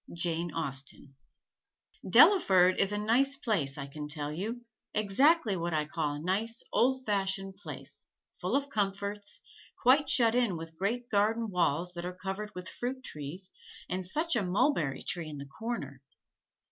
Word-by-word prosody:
JANE 170 0 -1
AUSTEN 140 -2 -5 0.9
Delaford 185 - +6
is 195 0 +3
a 205 - -1
nice 245 +7 +3
place 170 - -1
I 140 - -4
can 150 +2 -7
tell 150 -1 -2
you; 225 +8 -4 0.3
exactly 215 - +3
what 170 -1 -2
I 150 -1 +1
call 150 -1 -2
a - - -5
nice, 210 +8 -1
old 260 +1 +2
fashioned 195 -1 -1
place, 205 - -8 0.3
full - - -1
of 280 0 +1
comforts, 205 -3 -2 0.4
quite 270 +3 +4
shut 230 -3 +5
in 240 -8 +2
with 165 0 -8
great 230 +7 -2
garden 220 +2 +1
walls 175 0 +1
that 175 0 -5
are 180 - -6
covered 195 +3 -4
with 180 0 -6
fruit 260 +5 -4
trees, 165 - -6 0.4
and 185 +1 -2
such 310 - 0
a 235 - +2
mulberry 185 - +1
tree 165 -3 -3
in 150 - -7
the 140 - -7
corner. 220 - -5
195 Hz, 160 wpm, -30 LUFS, 165-230 Hz, 0.9 s, Delaford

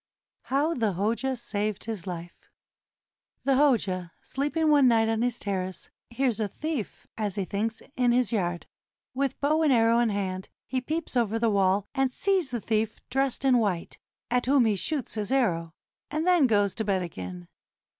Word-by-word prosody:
HOW 290 +5 +1
THE 225 - 0
HOJA 230 +8 -1
SAVED 210 -3 -3
HIS 215 -5 -5
LIFE 175 -1 -8 0.9
The 275 - +3
Hoja, 220 -11 +2
sleeping 305 +3 0
one 285 -3 +6
night 225 -2 +4
on 225 0 0
his 245 -1 0
terrace, 190 -2 -4 0.2
hears 240 -2 0
a 215 - 0
thief, 300 - -5
as 205 -3 -1
he 195 - -1
thinks, 220 +4 -2
in 245 -1 +3
his 250 +1 +2
yard. 175 -6 -1 0.5
With 270 0 -1
bow 305 +3 +2
and 305 -3 +4
arrow 230 -1 +4
in 240 -1 +3
hand, 190 -2 -3 0.2
he 255 0 -2
peeps 310 +3 -3
over 225 -2 +2
the 225 -1 +2
wall, 195 0 +2
and 270 -2 +1
sees 375 0 +1
the 245 -2 -2
thief 220 +1 -1
dressed 270 0 0
in 255 -2 +5
white, 190 -6 -2 0.3
at 250 0 +1
whom 270 -2 +5
he 215 -2 +2
shoots 280 - -2
his 210 0 -3
arrow, 170 -12 +1 0.4
and 310 +2 -1
then 355 -6 +5
goes 205 -4 +2
to 220 - -3
bed 195 -3 0
again. 90 - -7
230 Hz, 175 wpm, -27 LUFS, 200-270 Hz, 0.9 s, one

